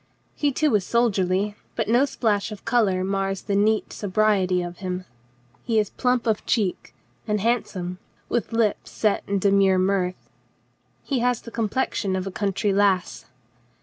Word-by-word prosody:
He 290 -1 0
too 300 +1 +1
is 205 -3 +3
soldierly, 205 -3 +1 0.2
but - - -1
no 240 +5 +4
splash 215 -6 -1
of 210 - -9
color 195 -6 +2
mars 195 0 -1
the 200 - -1
neat 215 +2 +1
so 205 - -5
briety 190 -3 +2
of 175 0 -11
him. 185 -1 -4 0.6
He 230 -2 0
is 210 -2 +1
plump 250 -1 0
of 220 -2 0
cheek 200 - -1 0.3
and 210 0 +1
handsome, 190 -5 -1 0.3
with 240 - -1
lips 225 -2 0
set 215 -2 0
in 200 - 0
demure 195 -1 +4
mirth. 185 -1 -1 0.7
He 270 -3 -1
has 245 0 +1
the 230 - -9
com 225 -2 -1
plexion 195 -5 -1
of 185 - -3
a 195 - -4
country 200 +1 0
lass. 195 -2 +1
205 Hz, 165 wpm, -24 LUFS, 190-225 Hz, 0.7 s, no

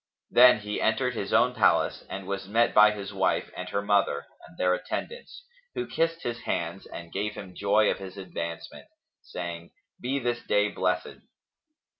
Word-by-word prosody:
Then 125 -3 +7
he 105 0 -3
entered 125 +3 +1
his 100 -4 -4
own 125 +1 +4
palace 115 -4 +2
and 95 0 -6
was 100 0 -4
met 115 +4 +2
by 105 0 +8
his 100 -2 -6
wife 95 -1 0
and 90 0 -6
her 100 - -1
mother 100 -8 +1 0.2
and - - -19
their 90 0 +2
attendants, 485 - -5 0.3
who 370 - -2
kissed 165 0 -1
his 120 -1 -3
hands 85 -1 -3
and 85 0 -9
gave 105 +2 -2
him 95 -2 -9
joy 105 +2 +3
of - - -4
his 95 0 -9
advancement, 85 -3 -6 0.3
saying, 85 -1 -6 0.3
"Be 130 +3 -1
this 120 -3 -1
day 105 0 +2
blessed!" - - -2
105 Hz, 170 wpm, -27 LUFS, 95-120 Hz, 0.3 s, by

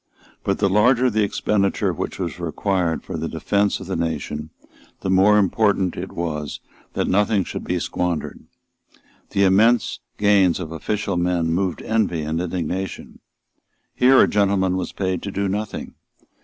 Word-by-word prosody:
But 100 - 0
the 100 - +2
larger 120 +6 +3
the 110 0 +1
expenditure 100 0 0
which - - -4
was 90 -2 -4
required 85 +1 -1
for - - -5
the - - -3
defence 100 0 0
of 95 - -8
the 95 - -3
nation, 80 -2 -3 0.5
the 95 - -1
more 100 +3 +5
important 100 -2 +2
it 95 +2 -6
was 75 -4 -4 0.3
that - - -1
nothing 105 +1 +2
should - - -6
be - - -1
squandered. 90 -3 -2 0.9
The 100 - +1
immense 110 +5 +3 0.2
gains 100 -4 +4
of 80 -3 -6
official 100 +4 -2
men 85 -2 +1
moved 90 0 -1
envy 105 -8 0
and 80 +2 -2
indignation. 90 +1 -4 0.7
Here 130 +1 +5
a - - +6
gentleman 100 -2 +2
was 95 -1 -3
paid 95 -2 -2
to 100 - -5
do 100 +1 -1
nothing. 105 +2 -4
95 Hz, 155 wpm, -22 LUFS, 85-105 Hz, 0.9 s, a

